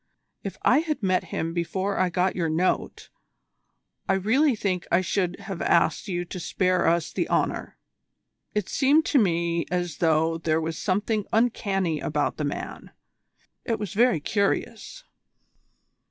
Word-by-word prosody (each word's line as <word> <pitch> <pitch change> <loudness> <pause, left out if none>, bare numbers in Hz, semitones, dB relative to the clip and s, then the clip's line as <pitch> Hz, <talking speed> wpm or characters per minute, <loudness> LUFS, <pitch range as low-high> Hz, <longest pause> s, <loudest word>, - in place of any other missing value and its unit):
If - - -5
I - - +5
had 310 -7 -3
met 185 -1 +1
him 165 +1 -3
before 190 +3 -2
I 185 -1 +2
got 180 +1 0
your 170 -3 0
note, 170 +4 -1 1.0
I - - +4
really 240 +9 +2
think 185 -4 -2
I 175 - +4
should 180 0 -1
have 195 -3 -6
asked 170 +3 +2
you 175 -2 -2
to 180 - -7
spare 185 +1 +1
us 170 -1 +1
the - - -1
honour. - - -1 0.8
It 210 -3 0
seemed 290 +4 +3
to 285 - +3
me 170 -4 +1
as 175 -4 -2
though 160 0 +2
there 160 -1 +1
was 160 0 -4
something 210 +2 -1
uncanny 195 -8 +1
about 150 0 -1
the 150 - -2
man. 145 - -5 0.7
It 230 -2 -1
was 210 -4 -5
very 235 -4 +3
curious." 200 - -2
185 Hz, 150 wpm, -25 LUFS, 170-210 Hz, 1.0 s, I